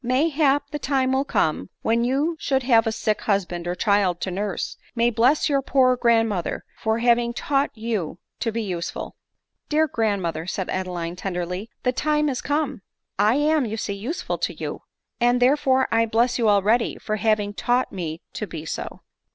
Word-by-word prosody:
mayhap 285 +2 +2
the 295 - -3
time 265 -2 +1
will 265 +1 +2
come, 155 - 0
when 230 +1 +2
you, 280 +7 +1
should 265 -1 0
you 250 - -7
have 225 -2 +5
a - - +1
sick 215 -1 -1
husband 180 -4 -1
or 175 - -1
child 200 -4 +2
to 185 - -3
nurse, 200 +1 -3 0.2
may 235 0 +3
bless 245 +6 +3
your 280 -2 +2
poor 255 -2 +3
grandmother 225 -6 +1
for 220 0 0
having 235 0 +3
taught 275 +3 0
you 215 -8 -3 0.2
to 230 - -1
be 230 +1 -2
useful." 180 -4 -4 0.5
"Dear 315 +1 +3
grandmother," 195 - -1
said 190 0 -3
Adeline 175 -2 -3
tenderly, 180 +3 -4
"the 250 - +2
time 300 +3 +1
is 260 - -2
come; 290 -5 -1 0.4
I 210 +4 +4
am, 300 +1 +3
you 220 +1 -4
see, 205 - -3
useful 240 - -4
to - - -2
you; - - -5 0.4
and, 245 +1 +3
there 255 +3 +5
fere, 265 -3 +2
I 230 0 +3
bless 235 +3 +2
you 225 -2 +3
already 210 +4 +2
for 215 0 -3
having 210 -1 +1
taught 245 +4 0
me 165 -4 -5
to 215 - -4
be 160 -2 -7
so." - - -5
230 Hz, 185 wpm, -23 LUFS, 200-265 Hz, 0.5 s, have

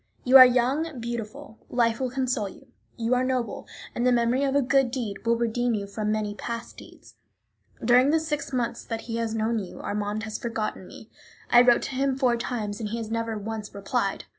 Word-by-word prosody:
"You 255 +1 +3
are 255 - +12
young, 260 +4 0
beautiful, 235 +2 -6
life 230 -2 +1
will 260 -1 -1
console 250 -5 -1
you; 270 - -15 0.3
you 230 +1 0
are 250 0 +2
noble, 255 -4 -2 0.3
and 240 - -2
the 250 - +4
memory 240 +2 +2
of 275 0 0
a 285 - +4
good 270 0 +3
deed 235 -6 -4
will 235 - +4
redeem 235 0 0
you 200 -1 -3
from 210 +1 -3
many 215 -1 -1
past 235 +2 -6
deeds. - - -14 0.7
During 250 +3 +5
the 320 +2 +3
six 295 -3 -3
months 240 -2 -2
that 225 -1 -4
he 230 -1 -5
has 225 -1 -2
known 225 +1 0
you 190 -3 -8
Armand 210 +1 -3
has 215 -1 -5
forgotten 220 -5 -4
me. 220 - -13 0.4
I 240 - +8
wrote 245 -1 +4
to - - -4
him 270 0 0
four 255 -3 +2
times, 220 -3 -4
and 215 -2 -3
he 230 - -3
has 225 -1 -5
never 230 -1 -2
once 215 0 -6
replied. 200 0 -2
235 Hz, 210 wpm, -26 LUFS, 220-255 Hz, 0.7 s, are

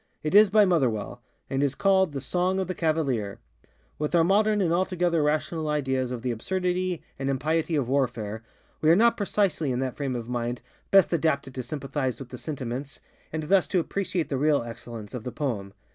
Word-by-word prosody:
It 155 - -2
is 210 0 +8
by 210 +1 +5
Motherwell, 130 - 0 0.3
and 135 0 -1
is 140 -1 +1
called 190 -2 +3
ŌĆ£The 135 - -2
Song 180 +6 0
of 190 - -1
the 185 - -2
Cavalier.ŌĆØ 140 - -2 0.3
With 150 +3 -1
our 165 - +5
modern 210 +4 +3
and 170 -4 +2
altogether 175 -2 +1
rational 155 +1 0
ideas 130 -4 0
of 125 -2 -5
the 125 - 0
absurdity 180 +7 -1 0.2
and 135 0 -1
impiety 155 +4 0
of 140 -5 0
warfare, 120 -5 -1 0.4
we 155 - +4
are 165 - +7
not 235 +4 +5
precisely 195 -8 0
in 125 - -1
that 130 -2 -2
frame 135 -3 -2
of 115 -1 -5
mind 120 0 -3 0.3
best 195 -2 +5
adapted 140 -5 0
to 130 - -4
sympathize 135 -1 -3
with 135 -3 -8
the 125 - -8
sentiments, 135 -2 -5 0.3
and 160 0 -3
thus 185 +3 +3
to 185 - +1
appreciate 180 -1 -2
the 135 - -1
real 145 -1 +2
excellence 115 -2 -8
of 125 -3 -5
the 125 - -4
poem. 110 -10 -3
150 Hz, 195 wpm, -26 LUFS, 130-180 Hz, 0.4 s, is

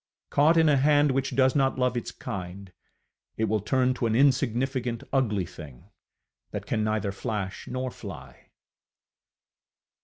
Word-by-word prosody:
Caught 155 +4 +4
in 160 -1 +5
a 145 -2 +4
hand 145 +1 +4
which 130 -1 -1
does 130 +1 +3
not 135 -2 +2
love 125 -1 +1
its 120 - -3
kind, 95 0 -7 0.6
it 110 - -1
will 110 0 +1
turn 130 +5 +1
to 125 -2 -1
an 110 - 0
insignificant, 130 -2 +1
ugly 105 -9 +1
thing, 75 -7 -12 0.6
that - - -6
can 110 - -1
neither 110 -2 -1
flash 100 0 -4
nor 130 0 -3
fly. - - -11
125 Hz, 145 wpm, -27 LUFS, 105-135 Hz, 0.6 s, in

